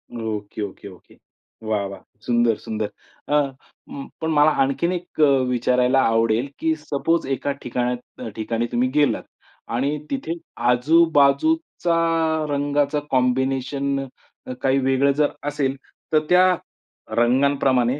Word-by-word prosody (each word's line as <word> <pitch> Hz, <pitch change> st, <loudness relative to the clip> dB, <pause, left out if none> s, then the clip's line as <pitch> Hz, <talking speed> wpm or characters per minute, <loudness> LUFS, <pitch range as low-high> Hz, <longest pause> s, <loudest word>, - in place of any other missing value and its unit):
Okay, 110 Hz, -2 st, -5 dB
okay, 100 Hz, 0 st, -6 dB
okay. 90 Hz, -2 st, -16 dB, 0.5 s
वाह! 105 Hz, -2 st, 0 dB
वाह! 100 Hz, -, -9 dB, 0.2 s
सुंदर, 120 Hz, -2 st, +2 dB
सुंदर. 110 Hz, -1 st, -4 dB, 0.4 s
अ, -, -, 0 dB, 0.6 s
म 275 Hz, 0 st, -7 dB
पण 160 Hz, 0 st, -1 dB
मला 150 Hz, 0 st, +5 dB
आणखीन 140 Hz, +6 st, 0 dB
एक 175 Hz, -2 st, -7 dB, 0.3 s
विचारायला 125 Hz, +1 st, +2 dB
आवडेल, 115 Hz, +2 st, +2 dB
की 160 Hz, 0 st, +1 dB
सपोज 155 Hz, +2 st, -1 dB
एका 140 Hz, +1 st, -1 dB
ठिकाण 125 Hz, 0 st, -1 dB, 0.4 s
ठिकाणी 115 Hz, +1 st, -2 dB
तुम्ही 125 Hz, +2 st, +1 dB
गेलात 150 Hz, -2 st, +2 dB, 0.5 s
आणि 140 Hz, +5 st, 0 dB
तिथे 265 Hz, -12 st, -2 dB, 0.4 s
आजूबाजूचा 165 Hz, -, +3 dB, 0.5 s
रंगाचं 145 Hz, +1 st, 0 dB
कॉम्बिनेशन 135 Hz, +2 st, 0 dB, 0.5 s
अ, 130 Hz, -, -5 dB
काही 135 Hz, 0 st, +2 dB
वेगळं 135 Hz, +1 st, +2 dB
जर 145 Hz, +1 st, +1 dB, 0.2 s
असेल 140 Hz, -2 st, -1 dB, 0.4 s
तर 155 Hz, -, +6 dB
त्या 180 Hz, +1 st, +6 dB, 0.7 s
रंगांप्रमाणे 130 Hz, +1 st, +2 dB
135 Hz, 115 wpm, -22 LUFS, 120-150 Hz, 0.7 s, तर